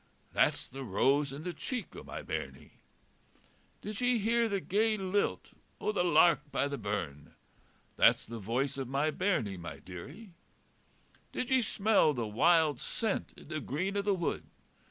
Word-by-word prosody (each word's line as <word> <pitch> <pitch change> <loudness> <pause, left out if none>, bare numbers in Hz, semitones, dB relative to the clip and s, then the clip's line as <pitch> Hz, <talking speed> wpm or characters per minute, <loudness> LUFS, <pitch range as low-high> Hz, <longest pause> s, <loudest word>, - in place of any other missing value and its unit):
That's - - +2
the 135 +1 -7
rose 135 +6 +2
in 140 +3 -7
the 180 0 -3
cheek 250 - -5
o' - - -7
my - - -7
bairnie. - - -6 1.0
Did 210 +2 -5
ye 245 -1 +3
hear 230 +2 +2
the 200 -1 0
gay 215 +4 +1
lilt 195 +1 -1 0.3
o' - - 0
the 195 -4 +1
lark 170 -3 +4
by - - +1
the 140 -1 -4
burn? 90 -9 -4 0.6
That's - - +5
the 115 0 -7
voice 125 +7 -1
of 135 - -3
my 140 +4 +1
bairnie, 150 - 0
my 85 -2 -7
dearie. 150 - -10 1.0
Did 250 - -3
ye 260 -1 +5
smell 205 -9 +3
the 120 -2 -1
wild 150 +5 +3
scent 220 -3 -2
in - - -14
the 155 -2 -2
green 180 +9 -2
o' 200 - +2
the 200 -1 +1
wood? 175 -2 -2
160 Hz, 165 wpm, -32 LUFS, 130-205 Hz, 1.0 s, That's